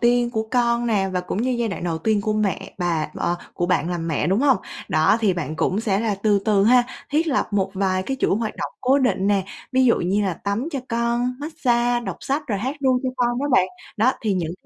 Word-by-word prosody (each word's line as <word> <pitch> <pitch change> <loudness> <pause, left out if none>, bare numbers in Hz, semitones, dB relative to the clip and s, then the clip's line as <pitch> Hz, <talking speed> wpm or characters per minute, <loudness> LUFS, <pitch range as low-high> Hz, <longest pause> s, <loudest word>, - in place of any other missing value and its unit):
tiên 240 0 +3
của 220 -2 -1
con 240 -1 +2
nè, 200 -4 +1
và 180 - 0
cũng 185 +4 -3
như 255 - 0
giai 240 -2 0
đoạn 185 -3 -5
đầu 165 -2 -1
tiên 215 +4 +1
của 215 +1 -1
mẹ 210 -2 -2
bà 165 -4 -1
ờ, 175 - -1 0.2
của 175 - -1
bạn 175 -2 +1
làm 170 -1 -3
mẹ, 150 -2 0
đúng 190 +6 +2
hông? 275 -3 +4 0.3
Đó, 155 +6 +3
thì 210 -4 +3
bạn 155 -2 -4
cũng 195 +6 0
sẽ 200 -3 0
là 220 -2 0
từ 210 -2 +4
từ 205 -3 +3
ha, 245 +2 +5 0.3
thiết 310 +4 +1
lập 285 -4 0
một 195 -1 +1
vài 190 -1 0
cái 270 +7 -3
chuỗi - - +2
hoạt 220 -1 -3
động - - -4
cố 265 +2 +3
định 250 -7 +1
nè. 200 -2 +2 0.3
Ví 260 0 +4
dụ 235 - +4
như 195 +4 +1
là 190 -3 -1
tắm 200 - -3
cho 275 - -1
con, 235 +1 0
massage 245 -5 +1
đọc 240 - -5
sách 280 +3 -1
rồi 210 -6 -1
hát 260 +8 -3
ru 260 -2 +2
cho 260 - 0
con 240 -1 +1
đó 285 - 0
bạn. 185 -7 +5 0.3
Đó 235 +5 +3
thì 210 -3 +1
những 170 -3 -2
220 Hz, 250 wpm, -22 LUFS, 190-245 Hz, 0.3 s, ha